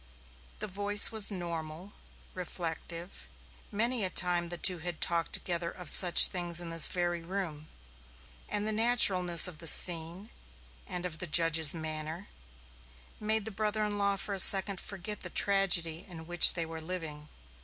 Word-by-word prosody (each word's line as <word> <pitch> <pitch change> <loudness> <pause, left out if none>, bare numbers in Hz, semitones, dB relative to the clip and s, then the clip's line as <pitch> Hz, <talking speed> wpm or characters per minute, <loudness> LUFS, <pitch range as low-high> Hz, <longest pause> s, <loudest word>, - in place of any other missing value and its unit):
The - - -8
voice 205 +2 +3
was 220 -2 -2
normal, 170 -1 -9 0.4
reflective. 170 0 -9 0.4
Many 230 +2 -1
a 185 - 0
time 175 -2 -1
the 175 - -5
two 180 -1 -4
had 175 0 -7
talked 170 -1 -3
together 170 -1 -4
of 180 0 -6
such 180 -2 +9
things 175 -2 -1
in 170 -1 -6
this 165 -1 +4
very 175 -1 -6
room, 165 -4 -9 0.8
and 210 +1 -4
the - - -3
naturalness 200 -7 +3
of 170 -4 -9
the 165 - -7
scene, 170 +5 0 0.6
and 180 0 -8
of 160 -3 -9
the 180 - -7
judge's 165 -1 +3
manner, 155 +3 -9 0.9
made 215 0 -1
the 220 - -8
brother 215 +1 -5
in 205 -1 -7
law 200 0 -2
for 200 +1 -7
a 195 - -7
second 195 0 +3
forget 200 +2 -9
the - - -5
tragedy 180 -4 -1
in 165 -2 -13
which 175 0 +5
they 170 -2 -4
were 160 0 -11
living. 160 -3 -9
175 Hz, 160 wpm, -27 LUFS, 165-200 Hz, 0.9 s, such